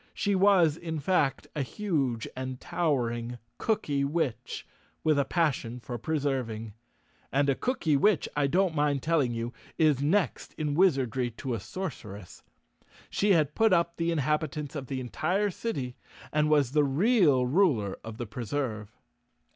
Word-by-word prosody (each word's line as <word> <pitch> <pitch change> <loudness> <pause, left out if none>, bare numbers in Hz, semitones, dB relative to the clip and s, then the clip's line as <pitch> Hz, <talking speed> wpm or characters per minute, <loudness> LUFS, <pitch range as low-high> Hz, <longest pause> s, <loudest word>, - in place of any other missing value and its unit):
She 205 -1 0
was, 185 -5 +4
in 160 -2 -4
fact, 145 -4 +1
a 150 - 0
huge 135 - -1
and 130 0 -5
towering 120 -7 -1 0.2
cookywitch 150 - -1 0.4
with 155 -2 +3
a 140 - +2
pas¬ 165 -5 +2
sion 120 0 -7
for 120 0 -6
preserving. 130 -7 -2 0.6
And 140 +1 +2
a - - 0
cookywitch, 175 - +2
I 145 -1 +2
don't 180 +3 +2
mind 145 -3 +1
telling 155 -6 +2
you, 115 +1 -4 0.2
is 150 -4 +3
next 160 - 0
in 150 -2 -2
wizardry 135 - +2
to 130 -3 -3
a 115 - -2
sorceress. 105 - -7 0.7
She 200 0 +3
had 150 -4 +2
put 225 -3 +3
up 170 -1 +1
the 165 0 0
inhabitants 150 -1 -1
of 135 -3 -5
the 130 0 -3
entire 180 - 0
city 135 - -4 0.4
and 150 0 +2
was 145 -5 +3
the 150 +1 +3
real 145 - +3
ruler 125 - +2
of 110 0 -8
the 120 - -4
Preserve. 110 -1 -4
145 Hz, 145 wpm, -28 LUFS, 125-170 Hz, 0.7 s, was